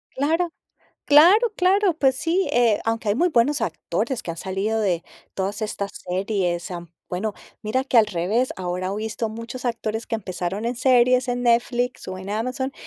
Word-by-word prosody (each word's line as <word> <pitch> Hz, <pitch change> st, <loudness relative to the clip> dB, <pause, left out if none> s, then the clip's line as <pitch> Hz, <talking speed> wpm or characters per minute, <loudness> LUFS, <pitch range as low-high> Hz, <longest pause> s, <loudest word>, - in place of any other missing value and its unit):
Claro 325 Hz, +5 st, +1 dB, 0.6 s
claro, 370 Hz, +11 st, +6 dB
claro, 380 Hz, 0 st, +3 dB
pues 265 Hz, -3 st, +3 dB
sí, 335 Hz, +6 st, 0 dB
eh, 235 Hz, -4 st, +3 dB
aunque 225 Hz, -1 st, -1 dB
hay -, -, +2 dB
muy 350 Hz, +8 st, +2 dB
buenos 285 Hz, +1 st, +2 dB
actores 265 Hz, -4 st, -2 dB
que -, -, -5 dB
han 165 Hz, -, -6 dB
salido 200 Hz, +4 st, -1 dB
de 180 Hz, -5 st, 0 dB, 0.3 s
todas 200 Hz, +3 st, -2 dB
estas 200 Hz, -2 st, -3 dB
series, 180 Hz, -2 st, -2 dB
am, 175 Hz, -2 st, -7 dB, 0.2 s
bueno, 205 Hz, +4 st, -2 dB, 0.3 s
mira 255 Hz, +5 st, 0 dB
que, 260 Hz, -3 st, +3 dB
al 220 Hz, -, +6 dB
revés, 205 Hz, +7 st, 0 dB
ahora 185 Hz, 0 st, -3 dB
o 200 Hz, -, -3 dB
visto 220 Hz, +1 st, -3 dB
muchos 230 Hz, +3 st, -7 dB
actores 225 Hz, -1 st, -2 dB
que -, -, -3 dB
empezaron 185 Hz, -1 st, -3 dB
en 240 Hz, +2 st, -1 dB
series 250 Hz, 0 st, +3 dB
en 245 Hz, 0 st, -1 dB
Netflix 240 Hz, 0 st, +1 dB
o 185 Hz, -, -4 dB
en 190 Hz, +1 st, -7 dB
Amazon 255 Hz, +5 st, -2 dB
225 Hz, 175 wpm, -23 LUFS, 195-260 Hz, 0.6 s, claro